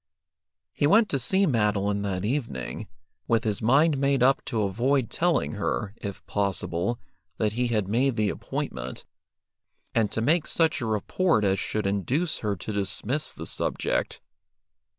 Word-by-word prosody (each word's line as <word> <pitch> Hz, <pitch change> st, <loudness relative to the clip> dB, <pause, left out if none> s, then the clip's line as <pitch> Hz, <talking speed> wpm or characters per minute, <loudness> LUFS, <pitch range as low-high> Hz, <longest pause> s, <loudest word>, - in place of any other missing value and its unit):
He 145 Hz, -, +2 dB
went 215 Hz, +6 st, +5 dB
to 140 Hz, -, 0 dB
see 190 Hz, +10 st, +3 dB
Madeline 105 Hz, -, +1 dB
that 100 Hz, -1 st, -2 dB
evening, 115 Hz, -, -3 dB, 0.4 s
with 115 Hz, -1 st, +2 dB
his 105 Hz, -4 st, -1 dB
mind 140 Hz, +6 st, +4 dB
made 140 Hz, -2 st, +2 dB
up 135 Hz, +2 st, +4 dB
to 110 Hz, -3 st, -1 dB
avoid 120 Hz, +5 st, +1 dB
telling 165 Hz, -, +1 dB
her, 85 Hz, +10 st, -2 dB
if 100 Hz, -2 st, -7 dB
possible, 100 Hz, +2 st, -1 dB, 0.4 s
that 105 Hz, -1 st, 0 dB
he 125 Hz, +2 st, 0 dB
had 110 Hz, -5 st, 0 dB
made 125 Hz, +5 st, +1 dB
the 105 Hz, -2 st, +1 dB
appointment, 60 Hz, +1 st, -5 dB, 0.9 s
and 110 Hz, -3 st, +2 dB
to -, -, -2 dB
make 155 Hz, +8 st, +2 dB
such 160 Hz, -4 st, +2 dB
a 120 Hz, -, -2 dB
report 110 Hz, -, +1 dB
as 95 Hz, -1 st, +2 dB
should 105 Hz, 0 st, -2 dB
induce 120 Hz, -, 0 dB
her 105 Hz, -2 st, -1 dB
to 105 Hz, +4 st, -6 dB
dismiss 105 Hz, +8 st, -1 dB
the -, -, -8 dB
subject. -, -, -2 dB
110 Hz, 150 wpm, -26 LUFS, 100-140 Hz, 0.9 s, went